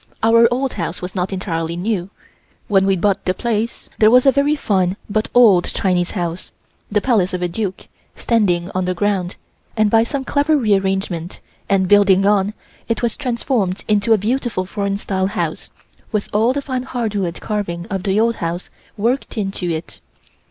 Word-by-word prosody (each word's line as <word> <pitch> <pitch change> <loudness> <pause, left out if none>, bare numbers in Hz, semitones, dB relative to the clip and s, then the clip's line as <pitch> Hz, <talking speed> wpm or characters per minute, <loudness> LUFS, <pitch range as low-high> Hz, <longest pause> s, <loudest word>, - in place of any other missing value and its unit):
Our 230 +1 +6
old 260 +1 -1
house 170 -2 -4
was 180 +1 -6
not 185 0 -2
entirely 170 -3 -3
new. 190 -1 -2 0.6
When 195 -2 +3
we 195 - +3
bought 195 +2 0
the 185 - 0
place 230 0 -2
there 215 - +6
was 250 +3 +5
a 270 - +7
very 280 +2 +2
fine 190 -8 0
but 215 +1 -1
old 210 -8 +6
Chinese 180 -2 0
house, 175 0 -3 0.4
the 210 0 +2
palace 200 -8 +1
of 180 - -3
a - - +1
Duke, 190 +1 -4 0.3
standing 185 -7 +1
on 185 0 -1
the 180 0 -1
ground, 190 -1 -1 0.4
and 215 -1 +3
by 225 - +5
some 265 +3 -2
clever 295 +2 +2
re 220 -7 +2
arrangement 190 -3 -1 0.3
and 190 -1 +2
building 195 -1 +5
on, 205 +1 +2 0.3
it 230 +1 -1
was 235 - 0
transformed 235 -7 -1
into 210 +1 +1
a 220 - +7
beautiful 225 -2 -1
foreign 200 +1 -2
style 190 -2 -1
house 200 - -3 0.4
with 210 -2 -2
all 220 +4 +3
the 280 +1 -3
fine 260 -2 -2
hardwood 215 -9 -3
carving 185 -5 -3
of 195 -1 -1
the 195 +1 +1
old 230 +1 +2
house 170 +1 -4 0.3
worked 240 +4 -1
into 195 -3 -2
it. 160 0 -5
200 Hz, 180 wpm, -19 LUFS, 185-230 Hz, 0.6 s, a